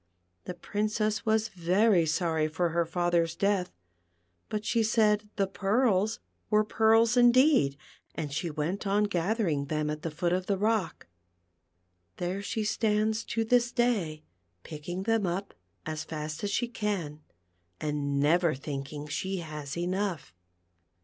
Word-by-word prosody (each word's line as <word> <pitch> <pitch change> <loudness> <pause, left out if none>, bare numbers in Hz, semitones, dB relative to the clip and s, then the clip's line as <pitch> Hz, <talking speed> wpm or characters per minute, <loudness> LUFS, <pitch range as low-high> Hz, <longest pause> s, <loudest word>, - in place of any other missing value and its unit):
The 180 - -5
Princess 215 +3 -1
was 220 0 +2
very 185 0 +3
sorry 160 -1 +1
for 170 +3 0
her 170 0 0
father's 170 -1 +1
death, 200 -3 0 0.8
but 215 0 -3
she 230 +1 +2
said 215 -1 +2
the 200 - +2
pearls 210 +2 +1 0.3
were 215 0 +4
pearls 225 +2 +3
indeed, 245 - +5 0.4
and 150 -3 -4
she 165 +3 -2
went 165 +7 -3
on 205 +2 +2
gathering 180 -5 0
them 150 +1 -1
at 150 0 -5
the 165 - -3
foot 170 +3 -1
of 185 0 -1
the 200 - +1
rock. 210 -3 0 1.1
There 180 +3 -2
she 215 +2 -2
stands 215 +1 +1
to 225 - -1
this 240 +1 +3
day 200 -12 0 0.4
picking 175 +4 -6
them 225 -2 +1
up 190 +3 -3 0.3
as 155 0 -4
fast 155 +1 -6
as 205 - 0
she 240 +4 0
can, 195 -10 -3 0.6
and 145 -2 -1
never 165 +2 +3
thinking 140 +1 -6
she 190 +6 -3
has 150 -3 -6
enough. 180 - -2
185 Hz, 140 wpm, -29 LUFS, 155-215 Hz, 1.1 s, indeed